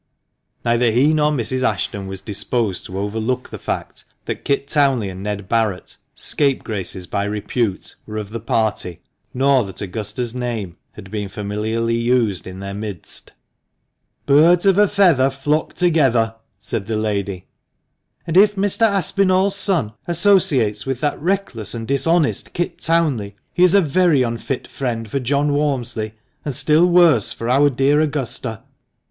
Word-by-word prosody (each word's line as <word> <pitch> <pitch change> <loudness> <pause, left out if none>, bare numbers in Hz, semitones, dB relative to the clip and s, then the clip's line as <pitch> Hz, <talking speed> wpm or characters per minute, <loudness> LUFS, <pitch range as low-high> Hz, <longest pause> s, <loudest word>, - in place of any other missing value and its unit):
Neither 120 0 +3
he 130 +7 +3
nor 150 -1 +2
Mrs. 130 -2 -1
Ashton 100 -6 -1
was 95 -1 -6
disposed 105 0 -2
to 95 - -7
overlook 110 +5 -2
the - - -7
fact - - -5 0.2
that - - -5
Kit 140 0 0
Townley 135 -8 +2
and 95 0 -8
Ned 100 -1 -4
Barret 110 -5 -1
— - - -51
scapegraces 105 - 0
by 100 - -2
repute 105 +1 -2
— - - -42
were 110 0 -6
of 105 -1 -5
the 115 - -4
party, 110 -6 -2 0.3
nor 135 0 +3
that 95 -2 -9
Augusta's 105 +4 -4
name 115 -8 -4 0.2
had 95 - -12
been 105 -2 -4
familiarly 110 +3 -2
used 115 -7 +1
in 95 +1 -8
their 100 0 -5
midst. 100 -3 -7 0.3
" - - -52
' - - -50
Birds 165 +6 +5
of 195 0 +4
a 210 - +6
feather 175 -10 +4
flock 145 +3 -1
together,' 135 -10 +2 0.2
" 100 - -49
said 100 -2 -3
the 110 -1 -1
lady; 100 -4 -2 0.4
" - - -49
and 165 - -3
if 205 +2 +6
Mr. 205 +3 +2
Aspinall's 195 0 +2
son 175 - 0
associates 165 - +2
with 135 -2 -3
that 145 -1 -1
reckless 165 - -2
and 115 -1 -5
dishonest 150 +4 +1
Kit 175 - -3
Townley, 145 -12 0 0.2
he 180 - +3
is 180 +1 +5
a 200 - +6
very 160 -3 +3
unfit 115 +2 -3
friend 115 -4 -4
for 135 +6 -2
John 140 +3 0
Walmsley, 120 -7 -2 0.3
and 145 -4 -4
still 155 +6 +4
worse 170 - +4
for 115 - -5
our 140 +4 +4
dear 135 +3 +2
Augusta." 135 -7 -3
125 Hz, 165 wpm, -20 LUFS, 105-150 Hz, 0.4 s, a